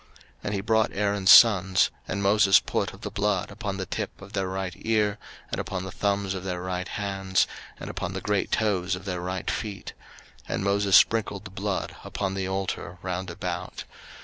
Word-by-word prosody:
03:008:024 -, -, -29 dB, 0.4 s
And 100 Hz, -, -1 dB
he 100 Hz, -, -1 dB
brought 110 Hz, +1 st, +2 dB
Aaron's 100 Hz, -1 st, +1 dB
sons, 95 Hz, -5 st, +7 dB, 0.2 s
and 100 Hz, -, -2 dB
Moses 100 Hz, -1 st, +6 dB
put -, -, -2 dB
of -, -, -14 dB
the 105 Hz, -, -5 dB
blood 105 Hz, -2 st, 0 dB
upon 100 Hz, -3 st, -4 dB
the 95 Hz, -, -3 dB
tip -, -, -4 dB
of 100 Hz, 0 st, -12 dB
their 95 Hz, -2 st, -1 dB
right 95 Hz, -1 st, -3 dB
ear, 105 Hz, -2 st, +1 dB, 0.3 s
and -, -, -1 dB
upon 95 Hz, -1 st, -4 dB
the 95 Hz, -, -6 dB
thumbs 100 Hz, -1 st, 0 dB
of 95 Hz, -1 st, -5 dB
their 90 Hz, -2 st, -3 dB
right 90 Hz, 0 st, -3 dB
hands, 95 Hz, -2 st, 0 dB, 0.3 s
and -, -, -7 dB
upon 90 Hz, -, -4 dB
the 95 Hz, -, -3 dB
great 105 Hz, 0 st, 0 dB
toes 95 Hz, -4 st, +1 dB
of 90 Hz, +2 st, -10 dB
their 90 Hz, -2 st, -3 dB
right 90 Hz, 0 st, -3 dB
feet: 100 Hz, -5 st, -5 dB, 0.6 s
and -, -, -1 dB
Moses 100 Hz, -1 st, +5 dB
sprinkled 105 Hz, -3 st, +2 dB
the 105 Hz, -, -8 dB
blood 95 Hz, 0 st, -3 dB
upon 95 Hz, -1 st, -3 dB
the 95 Hz, -1 st, -2 dB
altar 95 Hz, -1 st, -3 dB
round 90 Hz, 0 st, -3 dB
about. 85 Hz, -, -5 dB
95 Hz, 195 wpm, -26 LUFS, 95-100 Hz, 0.6 s, sons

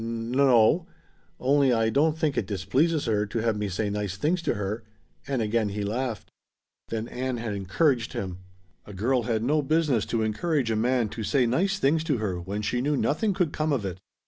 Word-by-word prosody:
"N 115 Hz, +3 st, -3 dB
o; 135 Hz, +5 st, +5 dB, 0.5 s
only 140 Hz, 0 st, +3 dB
I 115 Hz, -1 st, +2 dB
don't 155 Hz, +4 st, +2 dB
think 155 Hz, -3 st, 0 dB
it 95 Hz, -, -1 dB
displeases 130 Hz, -, +1 dB
her 105 Hz, -3 st, +1 dB
to 105 Hz, -, -4 dB
have 115 Hz, -1 st, +1 dB
me 105 Hz, -1 st, -2 dB
say 100 Hz, +2 st, -2 dB
nice 100 Hz, -2 st, -3 dB
things 165 Hz, -, 0 dB
to -, -, 0 dB
her." 105 Hz, +3 st, -3 dB, 0.5 s
And 130 Hz, -4 st, 0 dB
again 110 Hz, 0 st, 0 dB
he 105 Hz, +1 st, -3 dB
laughed. 115 Hz, +2 st, -3 dB, 0.6 s
Then 115 Hz, 0 st, -3 dB
Ann 130 Hz, 0 st, -3 dB
had 115 Hz, -2 st, -3 dB
encouraged 115 Hz, -, +1 dB
him. 90 Hz, -2 st, -4 dB, 0.5 s
A 105 Hz, -, -9 dB
girl 125 Hz, +6 st, +1 dB
had 110 Hz, -1 st, 0 dB
no 150 Hz, +5 st, +2 dB
business 145 Hz, -5 st, +1 dB
to 115 Hz, -2 st, 0 dB
encourage 125 Hz, +3 st, 0 dB
a -, -, +1 dB
man 120 Hz, 0 st, +1 dB
to 110 Hz, +2 st, -6 dB
say 120 Hz, +5 st, +2 dB
nice 185 Hz, +12 st, +1 dB
things 155 Hz, 0 st, +2 dB
to 145 Hz, -5 st, +1 dB
her 100 Hz, -5 st, -2 dB
when 100 Hz, +4 st, -4 dB
she 120 Hz, +4 st, 0 dB
knew 145 Hz, +2 st, +1 dB
nothing 195 Hz, +10 st, +1 dB
could 175 Hz, -5 st, 0 dB
come 155 Hz, 0 st, 0 dB
of 125 Hz, -8 st, 0 dB
it. 95 Hz, -1 st, -5 dB
115 Hz, 205 wpm, -26 LUFS, 105-145 Hz, 0.6 s, o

